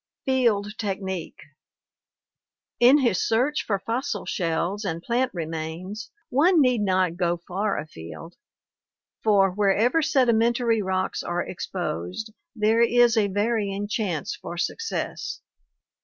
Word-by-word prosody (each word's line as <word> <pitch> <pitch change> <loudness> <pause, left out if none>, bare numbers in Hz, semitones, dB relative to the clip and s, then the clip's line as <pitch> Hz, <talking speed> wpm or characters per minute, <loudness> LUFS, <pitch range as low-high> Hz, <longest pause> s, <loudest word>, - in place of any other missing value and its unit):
Field 225 -6 +1
Technique 190 -4 -4 1.4
In 250 +4 +7
his 230 -8 +2
search 255 +7 +1
for 200 - 0
fossil 235 +7 -3
shells 180 +4 -1
and 170 -3 -3
plant 245 +4 +1
remains 170 +6 -5 0.2
one 330 +7 +4
need 250 -5 +3
not 185 -3 +1
go 175 -1 +1
far 195 +4 -2
afield, 150 - -8 0.9
for 200 -3 +4
wherever 210 - +2
sedimentary 235 -5 +2
rocks 190 -1 -1
are 175 0 -2
exposed 180 - -4 0.2
there 220 +1 +3
is 240 0 +5
a 215 -2 +3
varying 205 0 -1
chance 200 -7 -2
for 175 - -8
success. 435 - -3
205 Hz, 110 wpm, -25 LUFS, 180-235 Hz, 1.4 s, In